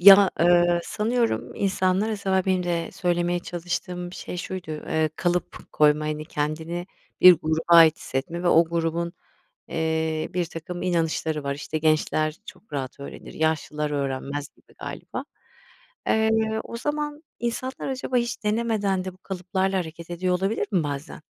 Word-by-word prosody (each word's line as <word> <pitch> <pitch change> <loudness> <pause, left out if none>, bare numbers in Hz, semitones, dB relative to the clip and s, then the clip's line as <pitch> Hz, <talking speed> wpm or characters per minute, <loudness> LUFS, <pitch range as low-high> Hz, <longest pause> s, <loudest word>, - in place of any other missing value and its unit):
Ya, 195 +1 +9
ııı, 175 0 +5
sanıyorum 230 +2 0
insanlara 190 0 +1
benim 185 -1 +2
de 170 -1 -1
söylemeye 175 -1 0
çalıştığım 175 +1 -4
şey 180 - -6
şuydu, 180 -2 -5
eee, 155 0 -1
kalıp 175 -1 -2
koyma, 150 0 +4
hani, 155 0 -2
kendini 160 +4 -3 0.3
bir 185 - +11
gruba 160 0 -1
ait 165 -2 +8
hissetme 155 +6 -3
ve 180 - +2
o 165 0 +6
grubun, 170 +1 -1 0.6
eee, 160 -1 -1
birtakım 175 0 -3
inanışları 160 -3 0
var. 140 0 -1
İşte, 150 +2 -4
gençler 155 0 +1
çok 220 - -13
rahat 135 -1 -4
öğrenir, 140 - -9
yaşlılar 150 -1 0
öğrenmez 140 0 -2
gibi - - -25
galiba. - - -6 0.8
Eee, 220 0 +2
o 235 - -7
zaman 295 +3 -3 0.2
insanlar 250 +4 -3
acaba 260 -1 -1
hiç 235 -2 -1
denemeden 210 -4 0
de 185 - -4
bu - - -20
kalıplarla 190 +1 -1
hareket 165 0 -7
ediyor 180 +1 0
olabilir 195 +3 0
mi 175 -5 +2
bazen? 145 +1 -5
175 Hz, 140 wpm, -25 LUFS, 155-190 Hz, 0.8 s, bir